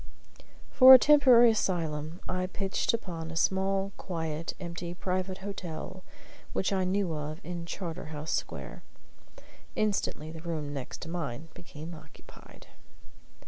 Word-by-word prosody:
For 260 0 +11
a - - +11
temporary 255 -4 +7
asylum 165 -5 -2
I 185 0 -1
pitched 195 +1 -1
upon 170 -8 -4
a 165 - -7
small, 195 +3 +1
quiet, 160 -3 -4
empty, 170 -1 -6
private 185 +1 -2
hotel 185 -1 -6 0.5
which 195 - 0
I 190 -1 +1
knew 185 -2 0
of 150 +1 -5
in 170 0 -6
Charterhouse 160 -4 -5
Square. - - -4 0.9
Instantly 195 -7 -1
the 160 0 -9
room 155 -4 -4
next 135 +3 -6
mine 165 -3 -5
became 170 -2 -9
occupied. 155 -2 -15
175 Hz, 120 wpm, -29 LUFS, 160-195 Hz, 0.9 s, For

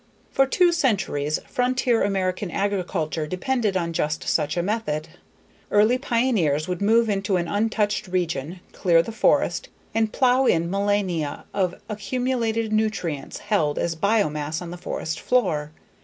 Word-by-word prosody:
For 270 0 +3
two 350 +6 +4
centuries, 195 - 0
frontier 250 -1 +1
American 190 -1 0
agriculture 180 -6 -1
depended 205 +3 0
on 170 -2 -2
just 150 0 -1
such 150 0 0
a 175 - +1
method. 195 -7 -2 0.6
Early 215 +5 +4
pioneers 225 - +1
would 180 0 -3
move 225 +3 +4
into 195 -2 0
an 170 -1 -1
untouched 210 0 0
region, 175 -2 -2
clear 170 -2 +3
the 225 - -6
forest, 220 - +1 0.2
and 220 -1 +1
plow 255 +2 +3
in 170 +1 +2
millennia 195 -6 -1
of 185 -3 0
accumulated 230 0 -1
nutrients 185 -10 -1
held 165 -9 0
as 170 -1 -1
biomass 160 -5 0
on 175 -1 -7
the - - -5
forest 160 -2 -4
floor. 180 -12 +1
195 Hz, 140 wpm, -24 LUFS, 165-225 Hz, 0.6 s, two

